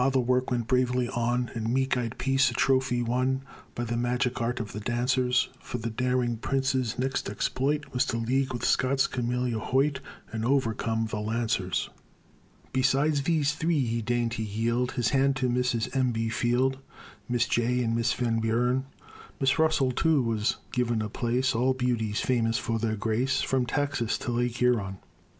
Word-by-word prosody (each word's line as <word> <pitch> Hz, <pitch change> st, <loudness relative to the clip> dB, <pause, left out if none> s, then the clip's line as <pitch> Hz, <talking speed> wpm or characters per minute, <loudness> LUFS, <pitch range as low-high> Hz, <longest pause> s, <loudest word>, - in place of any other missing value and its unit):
the 135 Hz, -, +3 dB
work 125 Hz, +1 st, +1 dB
went 120 Hz, -3 st, -1 dB
bravely 125 Hz, 0 st, +1 dB
on, 120 Hz, 0 st, -1 dB
And 115 Hz, 0 st, -2 dB
meek 130 Hz, +1 st, +1 dB
eyed 120 Hz, -1 st, -3 dB
Peace 135 Hz, 0 st, +3 dB
a 120 Hz, -, -6 dB
trophy 130 Hz, -2 st, +2 dB
won 130 Hz, +3 st, 0 dB, 0.3 s
By 120 Hz, -, -2 dB
the 120 Hz, 0 st, -2 dB
magic 120 Hz, +1 st, 0 dB
art 120 Hz, +2 st, -1 dB
of 110 Hz, -3 st, -5 dB
the 105 Hz, -, -5 dB
dancers; 125 Hz, +3 st, +1 dB
For -, -, -5 dB
the 115 Hz, 0 st, -4 dB
daring 125 Hz, 0 st, 0 dB
prince's 130 Hz, -1 st, 0 dB
next 130 Hz, -4 st, -1 dB
exploit 140 Hz, +8 st, -1 dB
Was 125 Hz, +1 st, +1 dB
to 115 Hz, -, -1 dB
league 130 Hz, +3 st, 0 dB
with 120 Hz, -2 st, -3 dB
Scott's 135 Hz, +1 st, +2 dB
Camilla 125 Hz, -1 st, -1 dB
Hoyt, 135 Hz, +4 st, +1 dB, 0.3 s
And 110 Hz, 0 st, -3 dB
overcome 115 Hz, -3 st, +1 dB
the 110 Hz, -1 st, -4 dB
Lancers. 110 Hz, -4 st, -1 dB, 0.8 s
Besides 140 Hz, +3 st, +2 dB
these 150 Hz, -1 st, +1 dB
three, 160 Hz, -3 st, +1 dB
he 115 Hz, 0 st, -1 dB
deigned 120 Hz, 0 st, 0 dB
to 115 Hz, -1 st, -3 dB
yield 115 Hz, +4 st, -1 dB
His 120 Hz, -2 st, +1 dB
hand 135 Hz, 0 st, +2 dB
to 130 Hz, -1 st, 0 dB
Mrs. 125 Hz, 0 st, 0 dB
M. 130 Hz, -2 st, +2 dB
B. 115 Hz, 0 st, -1 dB
Field, 125 Hz, +4 st, +1 dB, 0.5 s
Miss 120 Hz, 0 st, +2 dB
Jay 125 Hz, +1 st, +1 dB
and 115 Hz, -1 st, 0 dB
Miss 115 Hz, +1 st, +1 dB
Van 115 Hz, -2 st, 0 dB
Buren; 125 Hz, +4 st, +1 dB, 0.5 s
Miss 135 Hz, +2 st, +2 dB
Russell, 155 Hz, -5 st, +3 dB
too, 150 Hz, +1 st, +2 dB
was 110 Hz, -2 st, 0 dB, 0.2 s
given 120 Hz, -3 st, 0 dB
a 105 Hz, -, -4 dB
place 125 Hz, +4 st, 0 dB
All 130 Hz, +3 st, +2 dB
beauties 120 Hz, -4 st, 0 dB
famous 115 Hz, -2 st, +1 dB
for 115 Hz, -2 st, -2 dB
their 110 Hz, -1 st, 0 dB
grace 115 Hz, +5 st, 0 dB
From 130 Hz, -2 st, 0 dB
Texas 140 Hz, -3 st, 0 dB
to 125 Hz, -, -4 dB
Lake 120 Hz, 0 st, 0 dB
Huron. 110 Hz, -6 st, +1 dB
125 Hz, 175 wpm, -27 LUFS, 115-130 Hz, 0.8 s, the